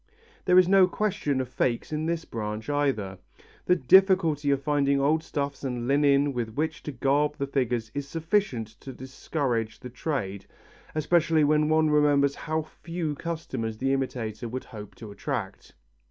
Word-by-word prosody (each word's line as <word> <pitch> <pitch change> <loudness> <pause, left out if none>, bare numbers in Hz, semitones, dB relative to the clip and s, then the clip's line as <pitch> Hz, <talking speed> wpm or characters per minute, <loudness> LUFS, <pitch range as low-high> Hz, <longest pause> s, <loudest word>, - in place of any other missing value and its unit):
There 180 0 +5
is 185 -1 +7
no 190 -1 +6
question 180 -9 -1
of 130 - -2
fakes 120 +3 -1
in 155 +1 -1
this 165 -1 -2
branch 110 +2 -4
either. 120 -10 -1 0.5
The 180 - +5
difficulty 165 -2 +4
in 140 - +3
finding 140 0 +1
old 150 +3 +2
stuffs 140 -2 -4
and 125 -3 -3
linen 140 0 +3
with 115 -3 -4
which 160 +1 -2
to 150 - -5
garb 145 +3 +1
the 140 - -1
figures 125 -5 -1
is 140 -1 -4
sufficient 165 - -1
to 135 - -9
discourage 130 -3 -3
the 125 - -8
trade, 120 -7 -4 0.5
especially 160 0 +3
when 150 +1 +3
one 155 -1 +3
remembers 145 -2 +3
how 155 +1 -3
few 165 0 -5
customers 135 -8 -4
the 135 +3 0
imitator 120 -4 -3
could 130 +3 -5
hope 105 -4 -10
to 110 -3 -10
attract. 110 -3 -5
140 Hz, 160 wpm, -27 LUFS, 125-155 Hz, 0.5 s, is